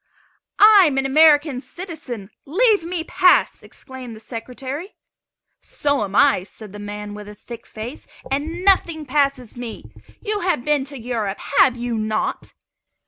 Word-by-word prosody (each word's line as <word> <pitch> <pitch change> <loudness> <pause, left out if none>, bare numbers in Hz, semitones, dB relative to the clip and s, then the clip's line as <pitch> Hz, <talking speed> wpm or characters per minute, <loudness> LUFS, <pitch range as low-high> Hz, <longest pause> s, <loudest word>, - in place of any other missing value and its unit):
"I 415 -2 +8
am 275 -3 -1
an 270 - +1
American 295 -1 +4
citizen; 280 - -8
leave 410 - +2
me 340 0 -3
pass!" 360 +2 +3
exclaimed 260 -4 -10
the - - -12
Secretary. 260 - -7 0.7
"So 285 -5 0
am 200 -1 -5
I," 275 -9 +4
said 210 +1 -12
the 205 - -8
man 205 0 -7
with 210 0 -9
a 210 - -11
thick 235 +2 -11
face; 230 +6 -8 0.2
"and 320 +6 -3
nothing 335 -5 +3
passes 275 -3 0
me. 240 -2 -8 0.3
You 420 -1 -2
have 345 -10 -1
been 295 -3 +1
to 280 0 -9
Europe, 225 -5 -3 0.2
have 255 -2 +5
you 240 -2 -3
not?" 215 0 -3
270 Hz, 150 wpm, -21 LUFS, 225-315 Hz, 0.7 s, I